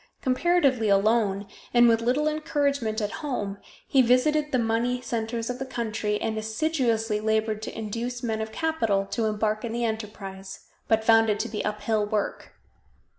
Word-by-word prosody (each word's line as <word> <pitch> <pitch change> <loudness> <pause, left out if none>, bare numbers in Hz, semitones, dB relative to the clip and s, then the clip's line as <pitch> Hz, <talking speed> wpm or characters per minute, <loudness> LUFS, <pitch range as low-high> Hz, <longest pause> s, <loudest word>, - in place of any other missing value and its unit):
Comparatively 265 -4 +2
alone, 200 0 +2 0.3
and 240 0 +7
with 230 -1 +4
little 260 +6 +1
encouragement 280 -7 0
at 210 0 -2
home, 205 -9 -3 0.3
he 270 - +4
visited 295 +5 +3
the 255 - +2
money 235 +2 0
centers 230 -1 -3
of 250 0 -4
the - - -2
country, 220 -4 -2
and 220 -1 -2
assiduously 225 -2 0
labored 220 0 0
to 220 - -6
induce 235 +3 -4
men 220 -2 -1
of 220 0 -4
capital 225 -11 0
to 225 +3 -2
embark 215 0 0
in 235 - -3
the 235 0 -1
enterprise, 195 -3 -6 0.3
but 220 0 +2
found 225 0 +5
it 210 -1 +1
to - - -1
be 215 - -4
uphill 210 +1 0
work. 210 -1 -3
225 Hz, 165 wpm, -26 LUFS, 215-250 Hz, 0.3 s, and